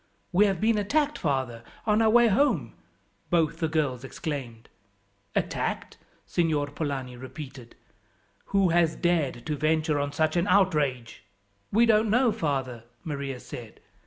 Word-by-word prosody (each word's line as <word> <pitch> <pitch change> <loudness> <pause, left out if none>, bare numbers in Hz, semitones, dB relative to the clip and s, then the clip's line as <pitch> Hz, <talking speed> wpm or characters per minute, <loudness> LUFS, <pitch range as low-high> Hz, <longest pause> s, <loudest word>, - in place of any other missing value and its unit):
"We 200 +3 +5
have 190 -3 -1
been 220 0 +2
attacked, 290 +8 0
father, 130 -7 -1 0.2
on 215 0 +3
our 220 - +4
way 240 +1 +6
home," 205 - +2 0.6
both 165 -3 +1
the 160 - +1
girls 145 -6 -1
exclaimed. 130 -5 -6 0.7
"Attacked?" - - -2 0.3
Signor 160 -4 +1
Polani 140 -4 -4
repeated. 130 -1 -10 0.7
"Who 195 -2 +2
has 165 -1 +3
dared 155 -9 0
to 150 - -1
venture 155 0 +1
on 145 0 -1
such 155 +2 0
an 175 +2 +1
outrage?" 150 -11 +1 0.5
"We 230 +4 +5
don't 220 -1 +3
know, 245 +2 +4
father," 130 - -2 0.2
Maria 140 -4 -4
said. 120 -2 -10
155 Hz, 135 wpm, -27 LUFS, 135-195 Hz, 0.7 s, way